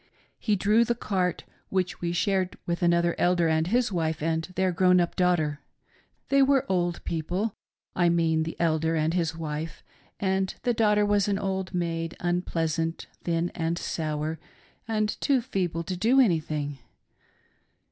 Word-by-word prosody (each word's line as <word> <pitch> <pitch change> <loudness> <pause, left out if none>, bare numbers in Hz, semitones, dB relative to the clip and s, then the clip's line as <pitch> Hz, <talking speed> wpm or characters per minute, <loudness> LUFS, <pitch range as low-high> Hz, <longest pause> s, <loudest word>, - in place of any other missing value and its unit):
He 210 - +1
drew 210 +4 +4
the 235 0 0
cart 185 -6 -1 0.3
which 185 -1 -1
we 170 -1 -1
shared 185 +1 0
with 170 0 -2
another 170 0 +3
Elder 175 -1 +3
and 160 0 +1
his 240 +3 +1
wife 160 -4 -1
and 160 0 0
their 185 -1 +2
grown 180 +1 +4
up 175 -1 0
daughter. 165 -5 +1 0.7
They 275 0 +4
were 270 -1 +4
old 175 -2 0
people 180 +6 -2 0.2
— - - -54
I 175 -1 +3
mean 165 -2 +2
the 165 +1 -4
Elder 160 -1 +1
and 160 +1 +1
his 165 -2 -1
wife 155 0 -5 0.2
— - - -35
and 190 -1 0
the 245 - +2
daughter 210 -2 +3
was 205 -1 +2
an 200 -1 +1
old 190 -1 -3
maid, 165 -1 -2
unpleasant, 165 -2 -1 0.2
thin, 170 0 0
and 165 0 -1
sour, 155 -1 -3 0.5
and 215 -1 -1
too 275 -3 +3
feeble 185 -9 -2
to 185 +2 -4
do 230 +9 +3
anything. 155 - +1
175 Hz, 160 wpm, -27 LUFS, 165-195 Hz, 0.7 s, drew